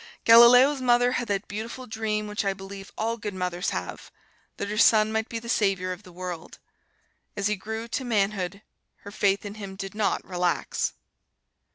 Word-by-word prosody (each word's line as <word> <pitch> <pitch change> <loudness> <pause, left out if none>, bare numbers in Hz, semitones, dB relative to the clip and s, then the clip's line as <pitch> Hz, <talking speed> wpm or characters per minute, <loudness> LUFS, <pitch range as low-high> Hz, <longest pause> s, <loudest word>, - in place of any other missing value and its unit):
Galileo's 245 +4 +8
mother 245 0 +3
had 245 -2 -2
that 200 -1 -2
beautiful 225 +5 -6
dream 220 -2 -2
which 210 0 -3
I 195 -1 0
believe 195 +1 -10
all 230 +1 -1
good 210 -3 -5
mothers 180 -1 -2
have: - - -5 0.5
that - - -3
her 210 +1 -4
son 215 -1 +5
might 220 +1 -1
be 230 - -4
the 230 +1 -8
savior 195 -5 +1
of 180 - -6
the 180 - -15
world. 175 -2 -7 0.8
As 200 - -2
he 210 +1 +2
grew 220 +3 -6
to 260 - -2
manhood, 200 -4 -1 0.4
her 200 - -10
faith 200 -1 +1
in 205 - -6
him 195 -1 -7
did 195 0 -6
not 210 -1 -1
relax. 180 -1 -1
210 Hz, 180 wpm, -26 LUFS, 195-230 Hz, 0.8 s, Galileo's